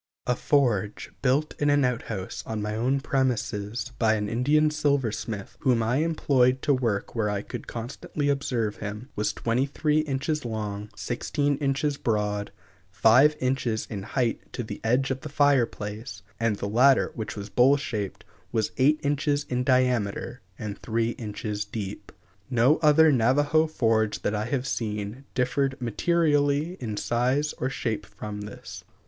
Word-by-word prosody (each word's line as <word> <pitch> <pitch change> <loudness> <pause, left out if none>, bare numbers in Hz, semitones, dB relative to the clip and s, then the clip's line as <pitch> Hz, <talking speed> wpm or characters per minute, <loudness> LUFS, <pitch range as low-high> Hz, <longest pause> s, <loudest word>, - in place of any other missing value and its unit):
A 125 - +1
forge 115 -8 +1
built 135 +4 +1
in 145 - +2
an 145 -1 +4
outhouse 115 -6 -3
on 110 -1 -3
my 105 0 -2
own 130 +5 +1
premises 125 -4 -1
by 110 -2 +4
an 105 -1 -2
Indian 150 +7 +3
silversmith, 130 -9 -1
whom 125 -5 +2
I 120 +4 +1
employed 135 -5 +2
to 145 - +3
work 115 -6 -1
where 110 -3 0
I 100 -1 -2
could - - -7
constantly 125 +5 -4
observe 125 -6 0
him, 105 +5 -6
was 105 - 0
twenty 120 +4 0
three 150 +2 +1
inches 150 +1 -1
long, 105 -3 -4
sixteen 140 - -1
inches 140 0 0
broad, 105 -3 -1 0.4
five 115 +9 +5
inches 125 -4 0
in 100 -3 -4
height 115 +3 -2
to 120 - -3
the 110 - -7
edge 125 +4 +2
of 130 0 -3
the 155 - -7
fire 145 -4 +4
place, 105 -2 -7 0.2
and 115 -2 +1
the 100 - -4
latter, 125 +5 +4
which 110 -3 -5
was 100 -1 -7
bowl 135 +3 +5
shaped, 105 -8 -4 0.3
was 110 -2 0
eight 145 +4 +4
inches 145 0 +1
in 125 0 0
diameter 125 -4 +1 0.2
and 105 -1 -6
three 115 0 0
inches 105 -2 -4
deep. 105 -1 -6 0.4
No 125 +4 +4
other 155 0 +6
Navajo 145 +6 +3
forge 110 -7 +1
that 105 - 0
I 105 0 -1
have 125 +1 -1
seen 105 0 -3
differed 130 +2 0
materially 145 - +1
in 110 -4 -4
size 130 +7 +1
or 130 - 0
shape 115 -5 -3
from 105 +1 -7
this. 105 0 -9
125 Hz, 155 wpm, -26 LUFS, 110-140 Hz, 0.4 s, other